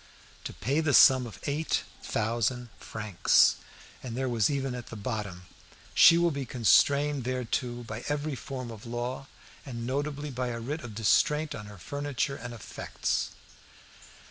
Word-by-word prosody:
"To - - -5
pay 135 +9 0
the 155 -3 +2
sum 130 -2 +7
of 110 - -11
eight 150 +3 0 0.2
thousand 120 +2 -1
francs." 105 -4 +3 0.4
And 120 -2 -6
there 130 0 0
was 115 -4 +2
even 135 -2 -1
at 125 -1 -7
the - - -8
bottom, 105 -5 -4 0.5
"She 165 - +8
will 170 0 +3
be 140 -2 -3
constrained 140 +3 +3
thereto 125 0 -2
by 115 0 -7
every 145 +1 -1
form 130 -2 -6
of 110 +1 -10
law, 120 +3 -4 0.4
and 120 -4 -6
notably 145 +3 -2
by 125 0 -2
a 115 -1 -3
writ 145 +7 -4
of 120 -4 -8
distraint 150 +8 +2
on 105 -1 -7
her 105 0 -11
furniture 140 +5 -3
and 120 -1 -7
effects." 115 -4 -3
125 Hz, 155 wpm, -29 LUFS, 115-140 Hz, 0.5 s, She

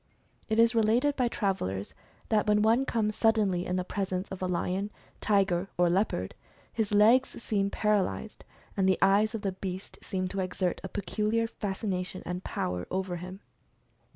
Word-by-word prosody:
It 220 - +1
is 230 +1 +6
related 235 +6 +3
by 250 -3 +2
travelers 145 - -2 0.4
that 215 -1 +2
when 210 0 +4
one 230 +5 +3
comes 215 -4 0
suddenly 210 -6 +2
in 180 - -1
the 185 - 0
pres 195 +1 -3
ence 185 +1 -2
of 190 - -7
a 185 - 0
lion, 185 +3 -1 0.3
tiger, 195 -3 +2
or 175 -1 +3
leopard, 175 - 0 0.4
his 220 -2 -1
legs 225 +6 +5
seem 200 -2 0
par 210 +1 +1
alyzed, 95 - -3 0.3
and 190 -1 +2
the 190 - +3
eyes 205 +3 +3
of 220 - -5
the 195 - 0
beast 190 0 -6
seem 185 -1 -2
to 195 - -4
exert 185 -1 -1
a 190 - -5
pe 205 - -4
culiar 220 +3 0
fascination 190 -4 -3
and 180 +1 -4
power 90 0 -3
over 185 -1 -2
him. 185 +3 -8
195 Hz, 180 wpm, -29 LUFS, 185-215 Hz, 0.4 s, is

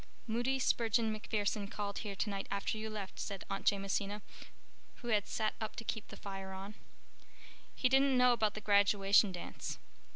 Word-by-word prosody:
"Moody 240 +4 0
Spurgeon 230 -3 +2
MacPherson 210 -1 -1
called 205 -1 -3
here 205 -3 -4
tonight 195 -1 -2
after 200 +2 -1
you 220 0 -4
left," 205 -3 -6
said 200 -2 -4
Aunt 195 - -3
Jamesina, 200 +1 -2 0.8
who 240 - -3
had 210 -3 +2
sat 215 -1 0
up 220 - -3
to 235 - -5
keep 220 -1 -3
the - - -10
fire 195 -1 -6
on. 195 +2 -7 1.0
"He 255 - +3
didn't 270 0 +4
know 250 0 +6
about 215 -3 +1
the 215 - -5
graduation 200 0 +5
dance. 175 -1 -5
210 Hz, 165 wpm, -35 LUFS, 200-225 Hz, 1.0 s, know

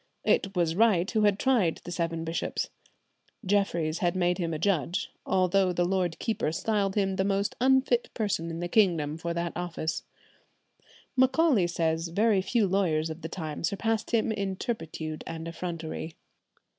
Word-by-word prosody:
It 195 0 +1
was 170 -2 +2
Wright 200 -4 +3
who 215 -1 +2
had 205 -1 +3
tried 220 -10 +2
the 175 - -7
seven 165 -1 -2
bishops. 165 +1 -2 0.7
Jeffries 170 -5 +1
had 175 0 +1
had 180 -1 +1
him 170 -2 -1
made 165 - -2
a - - -1
judge, 175 - 0 0.2
although 185 0 +3
the 175 0 +1
lord 180 -2 0
keeper 220 -8 -1
styled 200 +2 0
him 195 -2 +1
the 190 - +2
most 200 0 0
unfit 260 -2 +3
person 200 -7 -1
in 165 +1 -5
the 175 - -1
kingdom 170 -7 +2
for 170 +1 -3
that 170 0 -2
office. 170 -2 -3 1.1
Macaulay 260 - +4
says 165 -1 0
very 200 +3 +2
few 215 +3 +1
lawyers 165 -5 +1
of 160 +2 -8
the 160 - -5
time 155 -3 -5
surpassed 215 +5 -1
him 230 -1 +1
in 200 -3 -2
turpitude 160 - -4
and 165 0 -5
effrontery. 165 -1 -5
180 Hz, 165 wpm, -28 LUFS, 165-205 Hz, 1.1 s, Macaulay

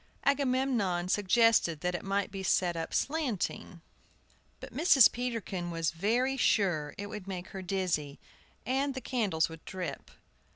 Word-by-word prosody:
Agamemnon 255 -10 +1
suggested 205 -4 +3
that 180 0 -1
it 175 - -3
might 195 0 -1
be 195 0 -5
set 180 -2 +1
up 165 0 -4
slanting; 255 - -2 0.8
but - - -10
Mrs. 280 -5 +6
Peterkin 230 -8 -3
was 165 -2 -1
very 235 +10 0
sure 175 - +1
it 205 - -5
would 205 -1 -8
make 185 -2 -6
her 190 - -7
dizzy, 175 -6 -2 0.5
and 270 +3 0
the - - -3
candles 210 -12 0
would 160 -1 -11
drip. 185 -2 -6
195 Hz, 140 wpm, -30 LUFS, 175-250 Hz, 0.8 s, Mrs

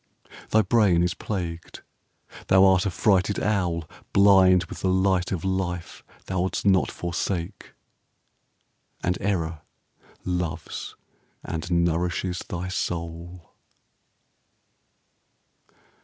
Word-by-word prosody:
Thy 110 0 +4
brain 95 -4 +3
is 90 0 0
plagued. 85 -5 -5 0.6
Thou 95 +1 +6
art 95 +1 +4
a - - 0
frighted 100 +1 +2
owl 90 -6 -1 0.3
Blind 95 -2 +6
with 80 - -9
the 95 - 0
light 95 -1 +1
of 95 -1 -3
life 90 -2 -3 0.2
thou'ldst 95 +1 -2
not 95 -2 +3
forsake, 85 +2 -4 1.3
And 90 - +1
Error 85 -5 -1 0.6
loves 90 -3 -4 0.5
and 85 +1 -5
nourishes 85 +1 0
thy 90 +1 -5
soul. 85 -1 -5
90 Hz, 95 wpm, -25 LUFS, 85-95 Hz, 1.3 s, Thou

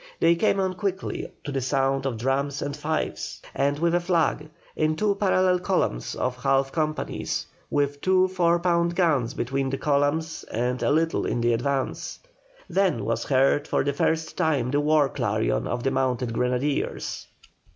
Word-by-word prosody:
They 170 - +5
came 200 +2 +2
on 190 -1 0
quickly 190 0 -3
to 145 - -5
the 135 -1 -1
sound 135 +1 +1
of 120 -4 -3
drums 135 +3 -1
and 145 - -3
fifes, 155 +1 -3
and 140 +1 +1
with 170 +2 +1
a 175 - +4
flag, 165 -4 0 0.3
in 155 0 +1
two 205 +4 +1
parallel 185 -2 +2
columns 175 - -1
of 125 0 -2
half 135 0 +2
companies, 155 -1 -2 0.2
with 145 0 0
two 185 0 +4
four 175 -2 +2
pound 170 -1 +1
guns 145 -10 +1
between 135 +2 -1
the 135 - -2
columns 145 +3 0
and 125 +2 -2
a - - +2
little 160 +2 +1
in 120 - -1
advance. 125 +3 -1 0.5
Then 185 - +1
was 115 +1 -1
heard 135 +2 +2
for - - +1
the 140 +1 0
first 160 +3 0
time 140 -6 +1
the 145 +1 +2
war 150 -1 +4
clarion - - -1
of 120 0 -3
the 135 - +1
mounted 130 -2 0
grenadiers. 125 +4 -1
145 Hz, 165 wpm, -25 LUFS, 130-170 Hz, 0.5 s, They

